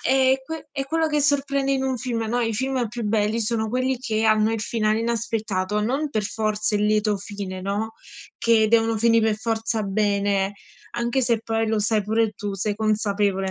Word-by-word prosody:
è 265 0 +3
que 320 -1 -7
è 275 -1 -3
quello 320 +3 0
che 300 -1 +1
sorprende 275 -1 +1
in 265 -1 0
un 265 -1 0
film, 240 -2 -2
no, 240 - 0
i 225 -2 0
film 260 +1 -1
più 235 +2 -6
belli 215 +1 +1
sono 220 0 -1
quelli 255 +2 0
che 220 -4 -1
hanno 215 0 +3
il 225 - -2
finale 215 0 0
inaspettato, 220 -4 -1
non 270 +8 -1
per 215 -6 -1
forza 215 0 -1
il 205 - +1
lieto 210 0 +2
fine, 195 -1 -6
no, 205 +4 -3 0.4
che 225 -2 +3
devono 225 0 +3
finì 230 +1 +4
per 220 -1 +2
forza 225 0 -1
bene, 200 -1 +1 0.4
anche 235 +2 0
se 235 -2 +2
poi 225 0 -1
lo 220 -1 +1
sai 210 0 +1
pure 220 +1 +1
tu, 205 -1 -4
sei 205 +2 -2
consapevole, 205 -3 0
220 Hz, 190 wpm, -23 LUFS, 210-240 Hz, 0.4 s, finì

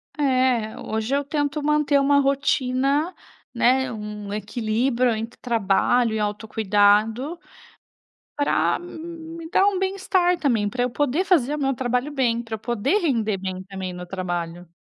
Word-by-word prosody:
É. 255 -6 +1
Hoje 220 +5 -2
eu 285 - 0
tento 290 +1 -2
manter 300 -1 +2
uma 280 +1 +4
rotina, 275 +3 +1 0.4
né, 255 +2 +2
um 210 -2 -6
equilíbrio 235 +4 0
entre 225 +2 -6
trabalho 230 +1 +2
e 220 - -1
autocuidado 215 - +1 1.0
para 290 - +1
me 330 -1 -9
dar 385 +2 +4
um 395 -2 +2
bem-estar 375 -2 +1
também, 230 -9 +1
pra 245 +4 -2
eu 250 - 0
poder 290 +7 0
fazer 300 -7 +2
meu 270 -2 0
trabalho 250 +3 -1
bem, 240 -4 +1
pra 225 -1 -6
eu - - -4
poder 240 - 0
render 225 - 0
bem 185 -1 -5
também 190 -1 -6
no 180 0 -7
trabalho. 175 -2 -4
250 Hz, 140 wpm, -23 LUFS, 215-290 Hz, 1.0 s, uma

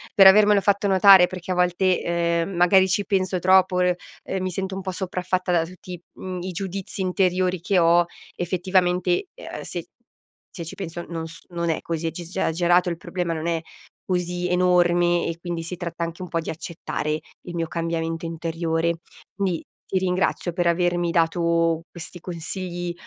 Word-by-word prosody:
per 195 - +8
avermelo 205 +1 +7
fatto 200 0 +2
notare 190 -1 +7
perché 185 0 -6
a - - 0
volte, 180 +1 +2
ehm, 170 0 0
magari 185 +2 +5
ci 200 +2 +1
penso 190 -2 0
troppo, 185 0 +4
r 180 -1 +3 0.3
ehm, 190 - -3
mi 185 - -1
sento 190 +1 -3
un 195 - -4
po' 190 - -4
sopraffatta 185 0 -2
da 170 -2 +2
tutti, 180 0 -10
mhmm, 185 -1 -6
i 185 +1 -4
giudizi 195 +2 -5
interiori 185 -1 +1
che 195 +2 +1
ho 170 +1 +5 0.3
effettivamente, 180 - +1
ehm, - - -8
se - - -6 0.6
se 170 - -7
ci 160 - -7
penso 175 -3 -6
non 165 -1 -4
s 165 +1 -12
non 170 -1 -2
è 160 - 0
così 165 0 -2
ecciss 170 +2 -7
esagerato. 175 +1 +2
Il 170 - -3
problema 175 -1 -3
non 160 0 -4
è 165 -1 0 0.4
così 180 -1 -1
enorme, 175 -1 +3
e 165 - -3
quindi 170 -1 -4
si 175 +2 -5
tratta 170 -1 -4
anche 170 +2 -5
un 180 - -8
po' 165 - 0
di - - -6
accettare 155 -2 -3 0.2
il 175 - -8
mio 165 -1 -1
cambiamento 165 0 -3
interiore. 165 0 -1 0.4
Quindi 185 -5 -1 0.2
ti 190 - 0
ringrazio 185 -1 0
per 175 0 0
avermi 175 0 +1
dato 165 0 +2
questi 175 +1 -9
consigli 175 +1 -5
175 Hz, 175 wpm, -23 LUFS, 170-185 Hz, 0.6 s, per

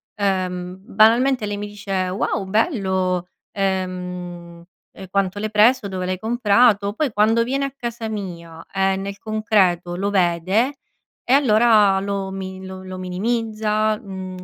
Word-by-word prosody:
ehm, 185 -3 -2
banalmente 225 +5 +3
lei 205 0 -3
mi 205 0 -5
dice: 205 -1 -9 0.2
"Wow, 195 +1 -1
bello, 190 - 0 0.3
ehm, 180 -3 -4 0.3
e 190 - -11
quanto 195 0 0
l'hai 215 +1 -2
preso, 220 +1 +4
dove 185 -2 -4
l'hai 185 0 -2
comprato", 215 -2 +3
poi 290 +3 -1
quando 220 +3 +3
viene 270 +3 -1
a 275 - -4
casa 235 -3 -5
mia, 170 -6 -7
ehm, 195 0 +1
nel 200 0 -5
concreto 200 -6 +1
lo 195 +3 -1
vede 190 - +1 0.5
e 250 - +1
allora 215 -6 +5
lo 200 -1 -3
mi 190 0 -7
lo 190 0 -8
lo 185 0 -7
minimizza, 215 +3 -1
mhmm, 190 -4 -8
200 Hz, 140 wpm, -21 LUFS, 185-220 Hz, 0.5 s, allora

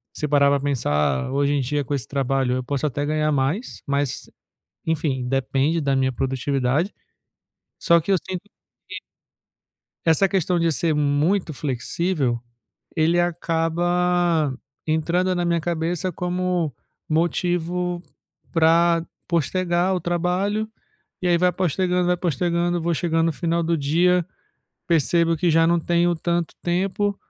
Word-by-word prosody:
Se 150 - -2
parar 140 -1 +4
para 140 - +2
pensar, 75 - 0
hoje 140 +1 +1
em 145 - +1
dia 145 +3 -1
com 135 - -11
esse 135 -2 -2
trabalho, 135 -2 0
eu 130 - -3
posso 140 +2 -2
até 145 0 -1
ganhar 155 0 0
mais, 145 - -1
mas, 140 -1 -2 0.6
enfim, 150 -5 -1
depende 135 +4 +1
da 140 -3 +1
minha 130 0 +1
produtividade. 135 - 0 0.9
Só 170 -1 +4
que 165 - -5
eu 195 - +5
sinto 185 0 -5 0.5
que - - -6 1.1
essa 165 +4 +4
questão 180 -2 0
de 165 - +2
ser 155 +3 0
muito 150 +4 +1
flexível, 135 0 -1 0.6
ele 165 +1 +3
acaba 175 -2 +1 0.3
entrando 170 +4 +1
na 175 -1 -1
minha 170 -1 +1
cabeça 170 +2 -2
como 180 -4 -1 0.3
motivo 175 +2 0 0.5
pra 165 0 +3 0.2
postergar 175 +3 +1
o 180 - -2
trabalho 180 +6 -1 0.5
e 185 - -2
aí, 175 -1 +3
vai 180 +1 +3
postergando, 180 0 0
vai 180 0 +2
postergando, 175 +1 0
vou 170 +1 0
chegando 165 0 +1
no 165 - +1
final 170 +2 -1
do 165 -1 0
dia, 170 +5 +2 0.6
percebo 165 +1 +2
que 175 +3 +1
já 165 0 +4
não 170 0 +3
tenho 175 +1 +2
tanto 170 0 -1
tempo, 195 +3 0
165 Hz, 140 wpm, -23 LUFS, 145-175 Hz, 1.1 s, eu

